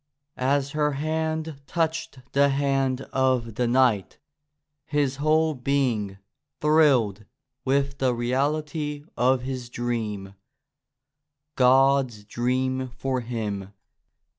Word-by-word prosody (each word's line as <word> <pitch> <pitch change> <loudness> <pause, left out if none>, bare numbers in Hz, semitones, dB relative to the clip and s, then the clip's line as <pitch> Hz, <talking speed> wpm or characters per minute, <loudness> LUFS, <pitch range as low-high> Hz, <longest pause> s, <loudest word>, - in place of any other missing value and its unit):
As 140 +2 0
her 150 -1 +1
hand 155 0 -2
touched 165 -4 -2
the 140 +1 +4
hand 135 -2 +1
of 130 -3 +1
the 120 +3 0
knight 120 -6 +2 0.7
his 140 -2 0
whole 155 +2 +2
being 125 -7 0 0.4
thrilled 135 -10 +3 0.4
with 140 +1 +1
the 130 -1 +2
reality 145 +4 -1
of 125 +1 +2
his 130 -2 -5
dream 110 -5 -3 0.6
— 130 - -60 0.5
God's 130 -3 +4
dream 130 +3 -1
for 135 -1 -1
him. 105 -5 -4
130 Hz, 100 wpm, -25 LUFS, 120-145 Hz, 0.7 s, the